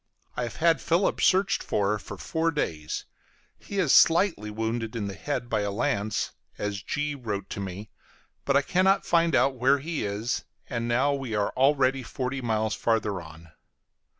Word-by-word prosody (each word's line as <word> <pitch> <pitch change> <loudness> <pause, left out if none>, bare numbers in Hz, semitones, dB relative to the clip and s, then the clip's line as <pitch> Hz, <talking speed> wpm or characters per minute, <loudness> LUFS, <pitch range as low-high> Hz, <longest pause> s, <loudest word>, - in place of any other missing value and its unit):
I - - -2
have 120 -4 -4
had 165 0 +3
Philip 170 +4 +1
searched 195 +1 +3
for, 105 +1 0
for - - -9
four 165 0 -1
days; 80 - -3 0.5
he 200 - -7
is 175 -8 +3
slightly 165 - +4
wounded 110 +1 -3
in 110 -3 -2
the 100 - -4
head 125 +1 -3
by 110 -3 0
a 100 - -1
lance, 105 -1 -1 0.3
as 105 -1 -3
G 145 +6 -2
wrote 105 -8 -5
to - - -4
me, 100 +2 -6 0.5
but 140 0 +3
I 140 - +2
cannot 190 +5 +2
find 165 -3 +3
out 135 0 +3
where 135 +3 +4
he 155 +3 -3
is, 105 +4 -2 0.2
and 115 -2 -3
now 130 +5 +2
we 135 -5 -3
are 105 -1 0
already 135 0 +3
forty 130 +1 -4
miles 110 -2 0
farther 105 -5 0
on. 80 0 -13
120 Hz, 175 wpm, -27 LUFS, 105-145 Hz, 0.5 s, slightly